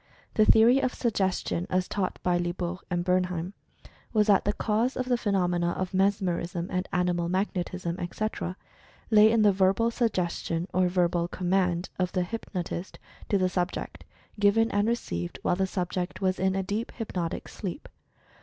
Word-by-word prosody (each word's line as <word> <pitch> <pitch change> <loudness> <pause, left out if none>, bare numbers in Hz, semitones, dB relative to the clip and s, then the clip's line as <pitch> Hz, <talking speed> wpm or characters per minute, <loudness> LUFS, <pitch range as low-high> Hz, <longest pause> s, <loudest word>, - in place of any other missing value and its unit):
The 215 - +4
theory 230 +5 +6
of 255 -1 -1
Suggestion, 190 -6 -1
as 185 0 +1
taught 195 -3 -2
by 180 -1 +2
Lie 175 0 -1
bault 180 0 -4
and 175 -1 -1
Bernheim, 180 0 0 0.6
was 215 -2 +4
that 205 -2 +4
the 205 - +1
cause 225 +5 0
of 255 - -1
the 250 -1 +2
phe 235 - -5
nomena 175 -3 +1
of 185 0 -3
"mesmerism" 185 -3 0
and 185 0 -2
"animal 175 -1 0
magnetism," 185 -2 -2
etc., 185 0 -3 0.5
lay 215 0 +7
in 225 -1 +3
the 205 - +6
"Verbal 195 +4 +2
Suggestion," 180 -6 -1
or 185 0 +3
"Verbal 175 -1 +1
Command" 180 -1 0
of 180 0 0
the 180 - +1
Hypnotist 180 -2 -5 0.3
to 200 - +3
the 185 -1 +2
subject, 180 0 -3 0.4
given 215 +2 +4
and 205 +1 +1
received 85 - -2
while 175 - +2
the 190 +1 0
subject 180 -1 -3
was 185 -1 0
in 190 0 +1
a 195 - 0
deep 210 +5 -3
hypnotic 180 -7 -4
sleep. 195 - -6
185 Hz, 165 wpm, -27 LUFS, 175-205 Hz, 0.6 s, lay